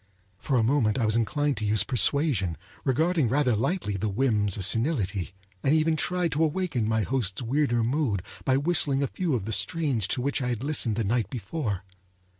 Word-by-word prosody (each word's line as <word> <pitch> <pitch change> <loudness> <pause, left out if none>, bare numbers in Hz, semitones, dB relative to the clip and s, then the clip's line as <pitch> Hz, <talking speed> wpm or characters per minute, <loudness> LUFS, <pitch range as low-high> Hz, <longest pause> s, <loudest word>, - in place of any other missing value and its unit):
For 135 +3 0
a 115 - +3
moment 115 -2 +2
I 120 - +1
was 110 0 +2
inclined 145 +5 0
to - - -4
use 105 -1 +3
persuasion, 120 - +1 0.3
regarding 155 0 +1
rather 130 -2 +2
lightly 125 - -1
the 105 +3 -1
whims 105 -3 +1
of 95 - +2
senility; 105 - 0 0.3
and 140 +3 +2
even 160 0 +2
tried 180 +1 0
to 150 +4 +1
awaken 155 - -1
my 110 -1 +1
host's 120 -3 -2
weirder 120 -1 +1
mood 120 - 0 0.2
by 130 0 +2
whistling 140 -2 +2
a - - +1
few 170 -3 -2
of 105 -6 -3
the 110 - -3
strains 115 - 0
to 125 - 0
which 140 +1 -1
I 125 - -1
had 120 0 -3
listened 140 -7 +1
the 115 - -1
night 110 0 0
before. 110 - -4
125 Hz, 195 wpm, -26 LUFS, 110-145 Hz, 0.3 s, a